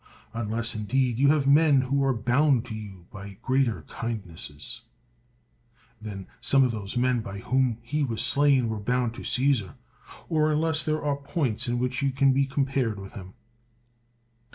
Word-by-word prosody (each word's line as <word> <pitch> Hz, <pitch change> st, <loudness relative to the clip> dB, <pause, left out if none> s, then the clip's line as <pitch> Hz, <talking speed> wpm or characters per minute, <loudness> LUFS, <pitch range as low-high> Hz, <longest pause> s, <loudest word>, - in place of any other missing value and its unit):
Unless, 115 Hz, +1 st, -1 dB
indeed, 120 Hz, +3 st, 0 dB
you 140 Hz, -, +5 dB
have 145 Hz, -1 st, +3 dB
men 145 Hz, -1 st, +5 dB
who 135 Hz, +2 st, 0 dB
are 135 Hz, -, +3 dB
bound 125 Hz, +2 st, +2 dB
to 120 Hz, -, -7 dB
you 100 Hz, -5 st, -9 dB
by 100 Hz, -2 st, -9 dB
greater 130 Hz, -, +1 dB
kindnesses 100 Hz, 0 st, -6 dB, 1.2 s
than 100 Hz, -3 st, -7 dB, 0.2 s
some 135 Hz, -1 st, +4 dB
of 125 Hz, -, +2 dB
those 105 Hz, 0 st, -5 dB
men 125 Hz, 0 st, +2 dB
by 100 Hz, -2 st, -7 dB
whom 125 Hz, +2 st, +1 dB
he 150 Hz, +5 st, -1 dB
was 115 Hz, -5 st, -1 dB
slain 140 Hz, -4 st, +3 dB
were 110 Hz, -1 st, -3 dB
bound 125 Hz, +2 st, 0 dB
to -, -, -9 dB
Caesar; 125 Hz, -7 st, +1 dB, 0.5 s
or 155 Hz, -1 st, +2 dB
un 150 Hz, -, +1 dB
less 160 Hz, -1 st, +1 dB
there 155 Hz, -1 st, -1 dB
are 145 Hz, -1 st, +1 dB
points 140 Hz, -5 st, -2 dB
in 120 Hz, 0 st, 0 dB
which 125 Hz, +1 st, -1 dB
you 140 Hz, -, +2 dB
can 135 Hz, 0 st, +3 dB
be 135 Hz, +1 st, +2 dB
com 135 Hz, 0 st, 0 dB
pared 130 Hz, -6 st, -1 dB
with 95 Hz, 0 st, -9 dB
him. 95 Hz, -2 st, -10 dB
125 Hz, 175 wpm, -26 LUFS, 110-140 Hz, 1.2 s, you